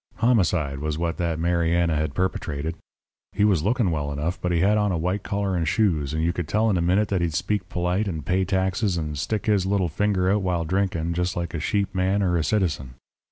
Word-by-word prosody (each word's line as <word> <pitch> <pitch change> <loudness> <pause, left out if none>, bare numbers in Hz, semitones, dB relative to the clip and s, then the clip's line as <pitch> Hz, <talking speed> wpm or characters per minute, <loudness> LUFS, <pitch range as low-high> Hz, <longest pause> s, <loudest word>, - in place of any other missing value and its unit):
"Homicide 90 - +1
was 75 +1 -2
what 85 0 -2
that 85 -2 -1
Mariana 85 0 +1
had 75 -1 -1
perpetrated. 80 -4 -2 0.6
He 100 - +1
was 95 -7 +3
looking 110 - +1
well 75 -2 -2
enough, 75 +5 -3
but 90 - -1
he 85 -1 +2
had 105 +2 +4
on 105 -1 +2
a 85 - 0
white 90 +5 -1
collar 100 -1 -2
and 85 -2 0
shoes, 80 -8 +1
and 80 +1 -1
you 85 +1 +1
could 90 -4 -4
tell 110 +5 +2
in 95 - +1
a - - 0
minute 95 +5 +2
that 95 -3 0
he'd 85 -3 -1
speak 95 0 -1
polite 90 +4 0
and 80 -7 -4
pay 95 +1 +1
taxes 95 +1 0
and 75 -2 -3
stick 105 +9 -2
his 100 -4 +2
little 95 -3 +1
finger 95 +2 +1
out 105 0 +2
while 90 -3 -1
drinking, 85 -2 0
just 90 +1 -1
like 85 0 -3
a 80 - -2
sheep 100 +5 -1
man 95 +2 +1
or 90 -2 +1
a 85 - +1
citizen. 80 -11 -1
90 Hz, 230 wpm, -24 LUFS, 80-100 Hz, 0.6 s, had